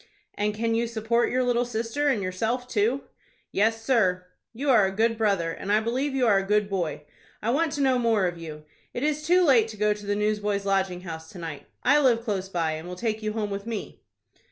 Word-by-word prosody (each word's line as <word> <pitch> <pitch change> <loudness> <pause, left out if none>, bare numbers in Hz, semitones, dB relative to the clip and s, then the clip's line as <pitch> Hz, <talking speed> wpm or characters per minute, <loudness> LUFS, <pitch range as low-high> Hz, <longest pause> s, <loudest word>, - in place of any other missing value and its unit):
"And 210 +1 -1
can 230 +1 0
you 230 +1 +1
support 230 +1 0
your 255 +1 +1
little 245 -1 +2
sister, 235 +4 -2
and 230 -8 +1
yourself 225 +7 -2
too?" 235 +4 0 0.5
"Yes, 225 +2 +1
sir." 185 -8 +2 0.3
"You 270 +4 0
are 215 -6 +5
a - - -3
good 225 +3 +1
brother, 200 -7 +1
and 195 +4 -4
I 210 - +5
believe 260 +5 -1
you 260 -2 +2
are 205 -4 +4
a - - -2
good 210 +1 +1
boy. 165 -6 -2 0.4
I 225 - -1
want 315 +4 +1
to 290 - -2
know 260 -2 +3
more 225 -5 +2
of 175 -1 -1
you. 155 -2 -9 0.3
It 245 - -2
is 300 0 0
too 355 +4 +4
late 240 -7 +5
to 220 -1 -9
go 210 0 +2
to 205 0 -11
the 205 - +1
Newsboys' 210 -1 0
Lodging 190 -2 0
House 160 -3 -8
to - - -10
night. 160 -4 -7 0.2
I 290 +3 +5
live 240 -5 +3
close 195 -4 -2
by, 165 -4 0
and 155 +2 -6
will 180 - -6
take 220 +2 -2
you 215 0 -2
home 210 -2 -2
with 200 +2 -5
me." 225 -3 -5
215 Hz, 230 wpm, -26 LUFS, 195-240 Hz, 0.5 s, are